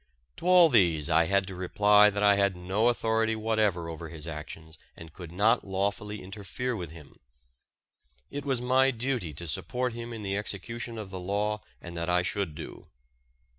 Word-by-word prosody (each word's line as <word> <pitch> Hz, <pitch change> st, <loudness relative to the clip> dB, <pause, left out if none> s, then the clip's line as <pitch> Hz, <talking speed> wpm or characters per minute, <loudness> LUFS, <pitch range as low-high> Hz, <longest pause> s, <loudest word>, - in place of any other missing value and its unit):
To -, -, -5 dB
all 180 Hz, -2 st, +7 dB
these 85 Hz, -, +3 dB
I 85 Hz, +1 st, +5 dB
had 100 Hz, +3 st, +2 dB
to 95 Hz, -, -7 dB
reply 105 Hz, +3 st, +4 dB
that 105 Hz, 0 st, -2 dB
I 100 Hz, 0 st, +6 dB
had 100 Hz, -1 st, +2 dB
no 95 Hz, +6 st, 0 dB
authority 110 Hz, -1 st, +1 dB
whatever 110 Hz, -6 st, 0 dB
over 80 Hz, 0 st, -7 dB
his 80 Hz, -1 st, -7 dB
actions 80 Hz, 0 st, -8 dB, 0.2 s
and 80 Hz, -1 st, -11 dB
could 85 Hz, -3 st, -10 dB
not 110 Hz, +7 st, +3 dB
lawfully 100 Hz, +1 st, -3 dB
interfere 105 Hz, +6 st, -4 dB
with 90 Hz, -6 st, -5 dB
him. 80 Hz, -3 st, -14 dB, 1.1 s
It 145 Hz, 0 st, -5 dB
was 135 Hz, -3 st, 0 dB
my 130 Hz, +2 st, +4 dB
duty 120 Hz, -, -2 dB
to 85 Hz, +4 st, -6 dB
support 125 Hz, -, -1 dB
him 120 Hz, 0 st, -7 dB
in 110 Hz, -2 st, -7 dB
the 100 Hz, 0 st, -2 dB
execution 115 Hz, +4 st, -3 dB
of 105 Hz, -3 st, -7 dB
the 95 Hz, -, -5 dB
law 105 Hz, +3 st, -1 dB, 0.2 s
and 85 Hz, 0 st, -9 dB
that 85 Hz, +1 st, -2 dB
I 90 Hz, 0 st, +3 dB
should 95 Hz, -4 st, -2 dB
do. -, -, -9 dB
100 Hz, 180 wpm, -28 LUFS, 85-115 Hz, 1.1 s, all